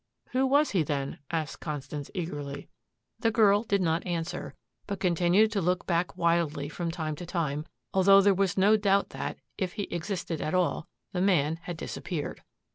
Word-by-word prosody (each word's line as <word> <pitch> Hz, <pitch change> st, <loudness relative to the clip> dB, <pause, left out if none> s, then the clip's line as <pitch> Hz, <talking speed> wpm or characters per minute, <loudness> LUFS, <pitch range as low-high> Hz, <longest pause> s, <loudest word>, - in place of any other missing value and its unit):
"Who 260 Hz, +1 st, +2 dB
was 290 Hz, +3 st, +3 dB
he, 185 Hz, -, +2 dB
then?" 140 Hz, -2 st, -2 dB
asked 160 Hz, -2 st, -3 dB
Constance 145 Hz, -1 st, -5 dB
eagerly. 145 Hz, -5 st, -5 dB, 0.5 s
The 225 Hz, -, +2 dB
girl 210 Hz, -2 st, +5 dB
did 200 Hz, -4 st, 0 dB
not 165 Hz, 0 st, +1 dB
answer, 170 Hz, -2 st, -4 dB, 0.3 s
but 200 Hz, -1 st, -3 dB
continued 180 Hz, +4 st, +3 dB
to 205 Hz, -3 st, 0 dB
look 180 Hz, +1 st, 0 dB
back 175 Hz, +1 st, 0 dB
wildly 165 Hz, -4 st, +1 dB
from 170 Hz, +2 st, -3 dB
time 160 Hz, -2 st, -3 dB
to 175 Hz, -, -6 dB
time, 155 Hz, -4 st, -2 dB, 0.3 s
although 195 Hz, +1 st, +7 dB
there 200 Hz, 0 st, +5 dB
was 195 Hz, 0 st, 0 dB
no 205 Hz, +3 st, +5 dB
doubt 200 Hz, -1 st, +2 dB
that, -, -, -5 dB, 0.2 s
if 185 Hz, -2 st, -1 dB
he 205 Hz, -, -3 dB
existed 175 Hz, -1 st, -3 dB
at 155 Hz, -, -1 dB
all, 180 Hz, -3 st, +1 dB, 0.3 s
the 180 Hz, -, 0 dB
man 165 Hz, -5 st, +2 dB
had 175 Hz, -1 st, -6 dB
disappeared. 160 Hz, -1 st, -5 dB
175 Hz, 175 wpm, -28 LUFS, 160-195 Hz, 0.5 s, although